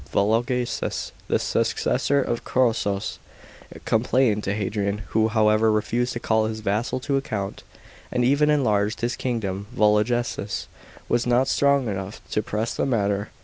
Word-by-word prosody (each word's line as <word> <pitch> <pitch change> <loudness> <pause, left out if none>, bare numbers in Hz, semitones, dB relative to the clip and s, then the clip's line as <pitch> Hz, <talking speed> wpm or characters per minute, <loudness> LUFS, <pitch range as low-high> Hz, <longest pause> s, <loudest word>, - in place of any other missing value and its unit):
Volo 110 +3 +3
geses, 125 0 -2 0.2
the - - +2
successor 135 +3 +1
of 120 -2 -3
Chosroes, 110 -6 0 0.7
complained 115 -1 +2
to 100 - -1
Hadrian, 105 0 -2
who, 110 0 +2
however, 110 0 +3
refused 115 +3 0
to 120 - -4
call 110 -1 +1
his 110 0 -5
vassal 110 +5 -1
to 140 +1 0
account, 100 -7 -4 0.5
and 125 -1 +1
even 145 +3 +3
enlarged 110 -7 +1
his 120 +1 0
kingdom. 100 -5 -3
Vologeses 105 0 +1 0.4
was 120 +1 +1
not 125 +2 +3
strong 140 -3 +2
enough 95 0 -4
to 105 - +1
press 110 +2 -2
the - - -1
matter. 100 -4 0
110 Hz, 145 wpm, -24 LUFS, 105-125 Hz, 0.7 s, Volo